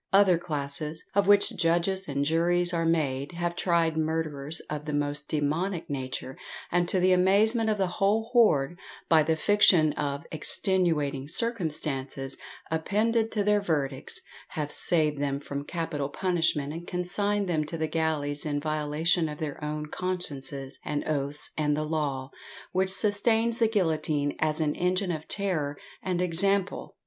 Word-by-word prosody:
Other 195 -3 +5
classes, 150 -1 -4
of 200 -1 +2
which 205 0 +5
judges 175 +3 +1
and 140 -1 -1
juries 175 +3 +2
are 165 -1 +1
made, 145 -2 0
have 170 0 -2
tried 170 -3 +1
murderers 160 -2 -2
of 150 0 -6
the 150 - -3
most 145 0 -2
demoniac 160 +4 -1
nature, 130 -1 -5 0.3
and 175 0 +1
to 190 - +1
the 185 +1 +4
amazement 215 +5 +3
of 215 - +1
the 195 - +2 0.2
whole 220 +4 +2
woard, 175 - +3 0.3
by 160 -1 +6
the 160 +1 +1
fiction 175 -4 +4
of 140 -1 -3
"extenuating 155 -5 +1
circumstances" 150 - -2 0.4
appended 220 +7 +1
to 210 -2 +1
their 210 0 +3
verdicts, 145 -7 -1 0.3
have 150 -2 -4
saved 155 -4 +3
them 140 -1 -1
from 140 0 -6
capital 160 -5 -3
punishment 165 -4 0
and 170 +1 -8
consigned 200 +3 0
them 160 -3 +1
to 165 +2 -5
the 160 - 0
galleys; 150 -3 -1
in 145 -2 -1
violation 155 +2 0
of 150 - -6
their 150 -1 -5
own 150 0 -3
consciences 145 -6 -5
and 150 -1 -3
oaths 145 -1 -2
and 150 -1 +1
the 155 - 0
law, 145 -4 -2 0.4
which 190 +1 +1
sustains 220 +4 +3
the 230 - +4
guillotine 155 -8 0
as 155 0 0
an 150 -2 +1
engine 180 +1 0
of 155 -2 -5
terror 160 -8 -1 0.2
and 180 -1 -1
example! 195 +3 0
160 Hz, 155 wpm, -27 LUFS, 145-185 Hz, 0.4 s, by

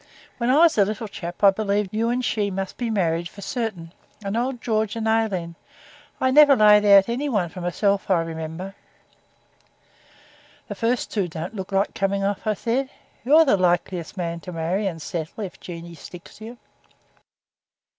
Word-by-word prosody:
When 235 0 0
I 265 - +4
was 325 -7 +5
a - - +7
little 215 +2 -4
chap 175 -1 -8
I 200 - +8
believed 205 -1 -1
you 225 +2 0
and 250 +1 -1
she 210 -2 0
must 195 0 -4
be 240 -2 -2
married 170 -5 0
for 200 - -12
certain. 195 -10 -4 0.3
And 195 +2 -2
old 245 +1 -1
George 220 -2 -1
and 225 -1 -2
Aileen. 205 -7 0 0.7
I 260 - +2
never 290 0 +7
laid 210 -2 +6
out 200 -1 +7
any 255 +5 -2
one 200 -9 0
for 180 - -9
myself, 200 +3 0
I 175 -3 +3
remember.' 165 +3 -6 1.9
'The - - -5
first 235 +2 -1
two 200 -5 0
don't 170 +5 -6
look 190 -1 -6
like 195 +1 +1
coming 195 0 -1
off,' 200 +2 -2
I 215 - +1
said. 250 +6 -1 0.3
'You're 305 +6 +6
the 260 - +3
likeliest 175 0 -1
man 170 -2 -3
to 180 - -9
marry 175 +5 -1
and 165 -4 -4
settle 165 +6 -5
if 190 - -8
Jeanie 170 -1 -9
sticks 170 +2 -12
to 215 - -10
you.' 235 +2 -10
200 Hz, 180 wpm, -23 LUFS, 175-225 Hz, 1.9 s, I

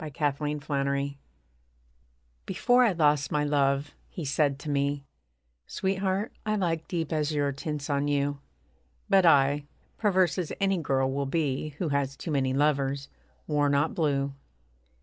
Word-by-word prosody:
BEFORE 150 -1 -1
AND 150 0 -3
AFTER 140 0 0 1.4
Before 245 +1 +3
I 225 -5 +3
lost 150 -3 +2
my 150 0 +1
love, 140 -1 +1 0.2
he 170 - -6
said 140 0 +1
to 145 +2 -7
me: 140 0 0 0.6
'Sweetheart, 190 +2 -1
I 215 0 0
like 165 -5 -1
deep 165 -3 -2
azure 150 -2 0
tints 145 +1 -4
on 145 0 0
you.' 145 0 0 0.7
But 190 -3 +5
I, 145 -1 +4 0.3
perverse 190 -5 +2
as 175 - -3
any 195 -2 +2
girl 135 -3 +1
will 140 0 -1
be 145 -1 -1
Who 170 -2 -1
has 140 -1 0
too 165 - -5
many 135 -3 +1
lovers, 140 -1 +1 0.4
wore 145 -2 +1
not 140 +3 +2
blue. 140 -4 0
145 Hz, 145 wpm, -28 LUFS, 140-165 Hz, 1.4 s, But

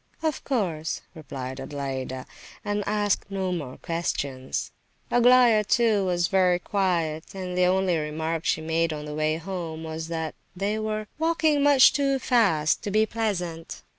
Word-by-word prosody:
"Oh, 320 - +3
of 295 - -7
course," 175 - -1
replied 135 -4 -7
Adelaida, 135 -2 -4 0.4
and 205 0 -1
asked 205 -1 0
no 190 -2 -2
more 145 -8 -4
questions. 140 -6 -3 0.4
Aglaya, 245 -2 +6
too, 215 -1 +3
was 175 -1 +1
very 180 -1 +3
quiet; 175 -4 -1
and 185 -1 -4
the 180 0 +3
only 185 -1 +2
remark 160 +2 -3
she 160 - +1
made 165 +1 0
on 150 0 -6
the 150 - -6
way 155 +1 0
home 165 -2 -5
was 160 0 -5
that 160 -1 -3 0.2
they 205 +3 -1
were 215 0 -2
"walking 320 -2 +2
much 280 -2 +7
too 275 -1 +1
fast 200 - +2
to - - -4
be 215 +2 +3
pleasant." 180 -8 -3
180 Hz, 155 wpm, -26 LUFS, 160-215 Hz, 0.4 s, much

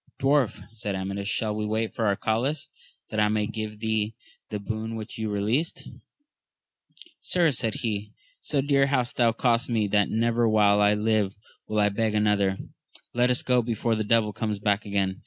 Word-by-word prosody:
Dwarf, 135 -4 +1
said 105 -3 -4
Amadis, 100 +1 -3
shall 110 0 0
we 105 - -2
wait 110 +1 -1
for 115 - 0
Arcalaus, 130 +9 -1 0.4
that 110 - -1
I 105 - +4
may 105 0 +1
give 110 -1 -5
thee 110 -1 -1 0.3
the 105 - -3
boon 110 +2 -4
which 110 0 -7
you 110 -1 -2
released? 110 - -1 1.3
Sir, 170 -4 +2
said 115 -4 -1
he, 105 -2 -3 0.3
so 145 -3 0
dear 140 0 +3
hath 125 -3 0
that 115 -2 +2
cost 120 -1 +2
me, 110 -3 +1
that 105 0 +2
never 115 +1 +2
while 105 -1 +4
I 105 0 +4
live 105 -2 +1 0.3
will 110 - -2
I 105 0 +4
beg 110 +1 -1
another: 105 -2 +2 0.6
let 120 +1 +3
us 125 - +1
go 125 -1 +3
before 115 0 -1
the 110 -1 0
devil 110 -1 +2
comes 105 -1 -2
back 105 +1 0
again. 95 -1 -1
110 Hz, 175 wpm, -26 LUFS, 105-115 Hz, 1.3 s, I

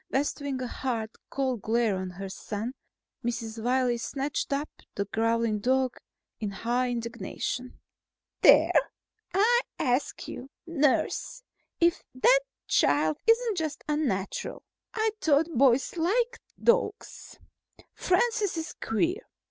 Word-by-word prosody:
Bestowing 280 -1 -1
a - - -2
hard, 230 -3 -3 0.2
cold 260 -5 -1
glare 225 -1 +1
on 185 0 -4
her 195 +2 -7
son, 210 +5 -5 0.5
Mrs. 230 -2 -3
Wiley 250 -1 +2
snatched 275 +6 -3
up 285 +2 0 0.3
the 200 - -1
growling 225 +1 +1
dog 260 +3 +1 0.4
in 210 - -2
high 240 +5 0
indignation. 240 +1 -4 0.6
"There! - - +7 0.6
I 470 +5 +5 0.2
ask 250 +1 -1
you, 260 +2 -7 0.2
nurse, 335 - 0 0.4
if 340 0 +3
that - - +5 0.3
child 150 +2 +3
isn't 455 -2 +3
just 310 -3 -3
unnatural. 270 -11 -2 0.3
I 440 0 +1
thought 315 +1 +2
boys 260 +2 +4
liked 470 +9 +1 0.2
dogs. 470 -3 0 0.6
Francis 410 0 +1
is 320 - -4
queer. 340 - 0
260 Hz, 115 wpm, -28 LUFS, 230-335 Hz, 0.6 s, There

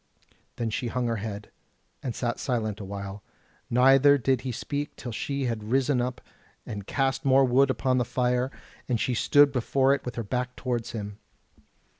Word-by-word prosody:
Then 115 -2 -2
she 120 - -2
hung 125 +1 -1
her 115 -1 0
head, 105 0 -6 0.5
and 125 -3 -4
sat 120 -2 -2
silent 110 -6 -2
a - - -6
while, 100 +1 -6 0.5
neither 135 +3 +6
did 130 -1 +1
he 130 -1 -3
speak 145 +5 -4
till 120 - -7
she 140 +5 -3
had 115 -3 -3
risen 130 0 +2
up 125 +1 -3 0.4
and 100 -2 -6
cast 135 -1 0
more 135 -1 +5
wood 135 +2 +4
upon 130 -1 +1
the - - +2
fire; 125 +1 0 0.4
and 120 -3 +1
she 125 - 0
stood 145 +4 +5
before 135 +1 +2
it 140 - -2
with 125 - -5
her 115 - -3
back 125 +4 -3
towards 120 -3 -3
him. 105 -2 -6
125 Hz, 180 wpm, -27 LUFS, 115-135 Hz, 0.5 s, neither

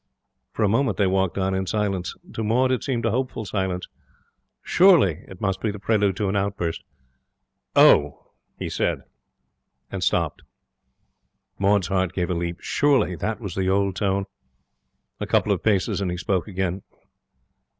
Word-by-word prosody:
For 110 - -2
a - - +4
moment 130 +7 +1
they 100 - +3
walked 95 -1 +1
on 95 0 0
in 95 0 -2
silence. 100 -4 -1 0.2
To 110 - -3
Maud 125 +4 +2
it 130 - 0
seemed 120 -4 -1
a 115 - +2
hopeful 125 -2 -2
silence. 95 -2 -2 0.8
Surely 150 - +4
it 95 - -12
must 95 -2 -1
be 110 - 0
the 105 - -4
prelude 100 -2 +1
to 105 - 0
an 95 - -1
outburst. 100 -4 -2 0.9
'Oh!' 75 0 +4 0.3
he - - -4
said, - - -1 0.9
and - - -3
stopped. - - 0 1.2
Maud's 100 -2 +2
heart 95 -2 0
gave 90 -1 -1
a - - +1
leap. 85 0 -3
Surely 135 - +2
that 110 +6 -3
was 100 -7 -6
the 95 0 -1
old 100 0 +1
tone? 100 0 0 0.9
A - - -3
couple - - +2
of - - 0
paces, 100 -2 +1
and 95 - -1
he 90 - -3
spoke 95 +1 -1
again. 95 -1 -2
95 Hz, 160 wpm, -24 LUFS, 95-110 Hz, 1.2 s, a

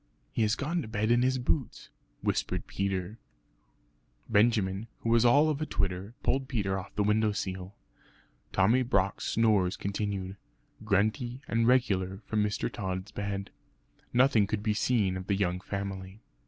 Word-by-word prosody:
"He - - -1
has 110 +2 +3
gone 165 +5 -1
to 130 - -7
bed 110 +1 0
in 120 0 +4
his 130 +1 +2
boots," 130 +1 -2 0.3
whispered - - -1
Peter. 100 +2 -3 1.1
Benjamin, 105 -1 +2
who 115 - -2
was 115 0 +5
all 145 +6 +6
of 155 -1 -1
a - - 0
twitter, 95 +2 -2
pulled 135 0 +1
Peter 100 -7 -1
off 95 - -11
the 105 - +2
window 105 +1 +2
sill. 95 0 -5 0.8
Tommy 110 +7 +4
Brock's 100 -6 0
snores 105 -5 +2
continued, 100 -1 -3 0.5
grunty 110 +6 0
and 115 0 +1
regular 95 -6 +2
from 105 -1 +1
Mr. 105 0 -1
Tod's 95 +1 -4
bed. 100 -1 -4 0.6
Nothing 120 -4 +4
could 105 0 -2
be 110 -1 +1
seen 105 -3 +1
of 95 0 -6
the 100 - +2
young 90 -2 0
family. 95 0 -5
105 Hz, 155 wpm, -29 LUFS, 95-115 Hz, 1.1 s, all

